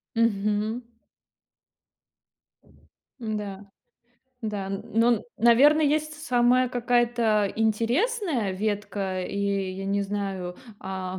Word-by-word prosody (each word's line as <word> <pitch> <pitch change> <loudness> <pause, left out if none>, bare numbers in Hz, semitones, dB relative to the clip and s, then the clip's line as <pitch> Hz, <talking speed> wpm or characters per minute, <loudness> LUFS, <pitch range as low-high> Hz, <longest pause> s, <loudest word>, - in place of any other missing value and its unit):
Мгм. 215 0 +1 2.4
М-да, 205 -3 -4 0.8
да, 210 -3 -3
н 195 0 -4
ну, 225 +2 +3
н - - -7
наверно, 260 +7 +6
есть 305 +1 +1
с 300 +1 -10
самая 250 0 +4
какая-то 240 -4 +1
интересная 235 - +1
ветка, 200 -1 -2
и 200 - -5 0.4
я 190 +1 -6
не 200 +1 0
знаю, 195 -3 -4 0.2
а, 190 -1 -5
215 Hz, 95 wpm, -26 LUFS, 200-245 Hz, 2.4 s, наверно